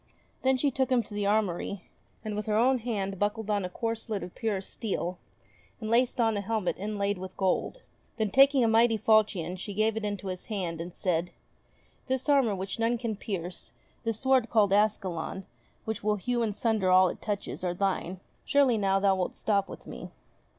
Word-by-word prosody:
Then 260 Hz, 0 st, +3 dB
she 280 Hz, +2 st, +1 dB
took 265 Hz, 0 st, 0 dB
him 245 Hz, -2 st, +3 dB
to 210 Hz, -, -12 dB
the 205 Hz, -1 st, -1 dB
armoury, 200 Hz, -2 st, 0 dB, 0.4 s
and 215 Hz, -1 st, -3 dB
with 210 Hz, +1 st, -4 dB
her 215 Hz, 0 st, +2 dB
own 255 Hz, +3 st, +4 dB
hand 200 Hz, -5 st, -3 dB
buckled 210 Hz, +1 st, -1 dB
on 205 Hz, -2 st, +1 dB
a 180 Hz, -, -3 dB
corselet 225 Hz, 0 st, -3 dB
of 180 Hz, -, -8 dB
purest 205 Hz, -4 st, -3 dB
steel, 180 Hz, -5 st, -3 dB, 0.6 s
and 220 Hz, 0 st, -4 dB
laced 245 Hz, +2 st, +2 dB
on 225 Hz, -2 st, +3 dB
a 205 Hz, -, -1 dB
helmet 205 Hz, -3 st, -1 dB
inlaid 205 Hz, -1 st, -1 dB
with 185 Hz, 0 st, -8 dB
gold. 195 Hz, -, 0 dB, 0.3 s
Then, 215 Hz, -3 st, 0 dB
taking 275 Hz, +1 st, +6 dB
a -, -, +4 dB
mighty 225 Hz, 0 st, +4 dB
falchion, 200 Hz, -5 st, +2 dB
she 200 Hz, +2 st, -6 dB
gave 215 Hz, +1 st, +2 dB
it 220 Hz, -, -3 dB
into 205 Hz, -2 st, -3 dB
his 185 Hz, -1 st, -6 dB
hand, 180 Hz, -6 st, -3 dB
and 175 Hz, +2 st, -6 dB
said: 175 Hz, -1 st, -1 dB, 0.8 s
"This 260 Hz, +1 st, -1 dB
armour 270 Hz, -8 st, +4 dB
which 190 Hz, +3 st, -5 dB
none 230 Hz, +1 st, +2 dB
can 230 Hz, -2 st, -3 dB
pierce, 185 Hz, -4 st, -5 dB, 0.3 s
this 225 Hz, -2 st, -2 dB
sword 265 Hz, -3 st, +3 dB
called 205 Hz, -4 st, +3 dB
Ascalon, 195 Hz, -3 st, 0 dB, 0.4 s
which 220 Hz, -2 st, -4 dB
will 210 Hz, 0 st, +2 dB
hew 240 Hz, +4 st, -1 dB
in 220 Hz, -3 st, 0 dB
sunder 215 Hz, -3 st, +1 dB
all 185 Hz, 0 st, +6 dB
it -, -, -7 dB
touches, 205 Hz, -3 st, -4 dB
are 175 Hz, -1 st, -1 dB
thine; 190 Hz, -1 st, -1 dB, 0.2 s
surely 270 Hz, -6 st, +3 dB
now 195 Hz, -1 st, +2 dB
thou 195 Hz, -1 st, +3 dB
wilt 185 Hz, -1 st, -2 dB
stop 200 Hz, -2 st, 0 dB
with -, -, -10 dB
me -, -, -8 dB
210 Hz, 195 wpm, -28 LUFS, 190-230 Hz, 0.8 s, taking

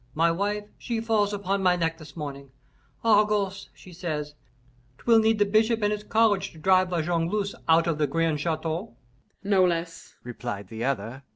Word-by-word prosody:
My 165 Hz, +2 st, +3 dB
wife, 205 Hz, +4 st, -1 dB, 0.2 s
she 235 Hz, -2 st, -3 dB
falls 220 Hz, -3 st, +1 dB
upon 200 Hz, -1 st, -1 dB
my 180 Hz, -1 st, +4 dB
neck 165 Hz, -1 st, -1 dB
this 155 Hz, +1 st, -13 dB
morning. 140 Hz, -2 st, -6 dB, 0.6 s
'Argose,' 210 Hz, -3 st, +2 dB
she 180 Hz, -, -14 dB
says, 155 Hz, -4 st, -4 dB, 0.6 s
''twill 230 Hz, +5 st, +4 dB
need 220 Hz, 0 st, +3 dB
the 205 Hz, -, +3 dB
bishop 220 Hz, +2 st, +2 dB
and 205 Hz, -, +2 dB
his 210 Hz, 0 st, -5 dB
college 220 Hz, -3 st, +2 dB
to -, -, -15 dB
drive 185 Hz, +2 st, +3 dB
La 170 Hz, -3 st, 0 dB
Jongleuse 175 Hz, +5 st, -1 dB, 0.2 s
out 165 Hz, +1 st, +5 dB
of 165 Hz, -3 st, -1 dB
the 150 Hz, -, +2 dB
grand 165 Hz, +1 st, 0 dB
chateau.'" 160 Hz, -4 st, -3 dB, 0.5 s
"No 195 Hz, -2 st, +3 dB
less," 170 Hz, -1 st, -2 dB
replied 120 Hz, -5 st, -6 dB
the 110 Hz, +1 st, -5 dB
other. 130 Hz, 0 st, -2 dB
175 Hz, 175 wpm, -26 LUFS, 155-205 Hz, 0.6 s, out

